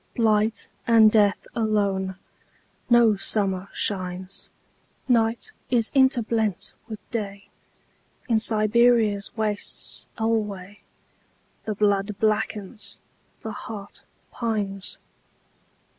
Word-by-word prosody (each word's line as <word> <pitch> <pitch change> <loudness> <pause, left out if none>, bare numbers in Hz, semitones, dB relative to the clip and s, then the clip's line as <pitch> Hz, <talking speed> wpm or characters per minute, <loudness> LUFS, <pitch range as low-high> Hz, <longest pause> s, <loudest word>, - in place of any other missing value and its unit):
Blight 220 -1 +1 0.2
and 225 -2 +7
death 205 -3 +3
alone.No 210 +2 0
summer 195 -2 0
shines. 185 -1 -2 0.6
Night 230 -2 +1 0.2
is 235 -3 +1
interblent 230 -7 +1
with 215 -2 -9
Day.In 210 +2 -6
Siberia's 220 -1 +3
wastes 210 -2 -1
alwayThe 210 -1 -5
blood 205 -1 +1
blackens, 215 0 -1 0.4
the 220 - -5
heart 205 -1 -8 0.3
pines. 205 -5 -2
215 Hz, 70 wpm, -24 LUFS, 200-225 Hz, 0.6 s, and